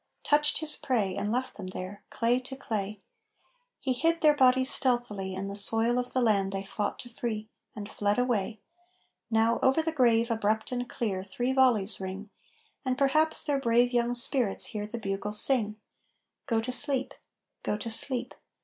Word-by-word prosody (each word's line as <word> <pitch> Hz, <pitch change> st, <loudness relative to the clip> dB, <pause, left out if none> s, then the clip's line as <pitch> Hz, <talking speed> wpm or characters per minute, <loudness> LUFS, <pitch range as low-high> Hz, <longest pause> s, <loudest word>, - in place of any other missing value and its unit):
Touched 295 Hz, +1 st, +4 dB
his 310 Hz, -1 st, +2 dB
prey 210 Hz, -8 st, -1 dB
and 210 Hz, -, -2 dB
left 255 Hz, +2 st, -3 dB
them 190 Hz, -3 st, -7 dB
there, 185 Hz, +2 st, -7 dB
Clay 240 Hz, +2 st, +1 dB
to 265 Hz, +1 st, -8 dB
clay. 215 Hz, -5 st, -4 dB, 0.8 s
He 260 Hz, -, -1 dB
hid 330 Hz, +6 st, 0 dB
their 300 Hz, -2 st, +5 dB
bodies 260 Hz, 0 st, +4 dB
stealthily 225 Hz, -7 st, -1 dB
In 195 Hz, +1 st, -4 dB
the 200 Hz, -, -6 dB
soil 225 Hz, +4 st, +2 dB
of 250 Hz, -, -4 dB
the 255 Hz, -, 0 dB
land 200 Hz, -4 st, +2 dB
they 195 Hz, 0 st, -3 dB
fought 205 Hz, +1 st, -3 dB
to -, -, -10 dB
free 220 Hz, -2 st, -5 dB, 0.3 s
And 205 Hz, -2 st, -6 dB
fled 205 Hz, 0 st, -1 dB
away. 225 Hz, -4 st, -1 dB, 0.7 s
Now 225 Hz, +1 st, +2 dB
over 265 Hz, +5 st, +3 dB
the 325 Hz, -, -1 dB
grave 235 Hz, -5 st, +2 dB
abrupt 220 Hz, 0 st, -1 dB
and 245 Hz, -1 st, -3 dB
clear 195 Hz, -5 st, -3 dB
Three 245 Hz, +7 st, -2 dB
volleys 230 Hz, -7 st, +2 dB
ring; 190 Hz, +2 st, -6 dB, 0.5 s
And 255 Hz, -2 st, -1 dB
perhaps 305 Hz, +3 st, +3 dB
their 290 Hz, -3 st, 0 dB
brave 240 Hz, 0 st, +2 dB
young 240 Hz, 0 st, +1 dB
spirits 240 Hz, -3 st, +2 dB
hear 210 Hz, -2 st, -4 dB
The 235 Hz, -, -6 dB
bugle 200 Hz, -1 st, -4 dB
sing: 215 Hz, -1 st, +1 dB, 0.7 s
"Go 225 Hz, -4 st, +1 dB
to 250 Hz, +3 st, -3 dB
sleep! 265 Hz, 0 st, +2 dB, 0.5 s
Go 210 Hz, -, -2 dB
to 225 Hz, +2 st, -5 dB
sleep! 250 Hz, +2 st, +1 dB
235 Hz, 175 wpm, -28 LUFS, 210-255 Hz, 0.8 s, their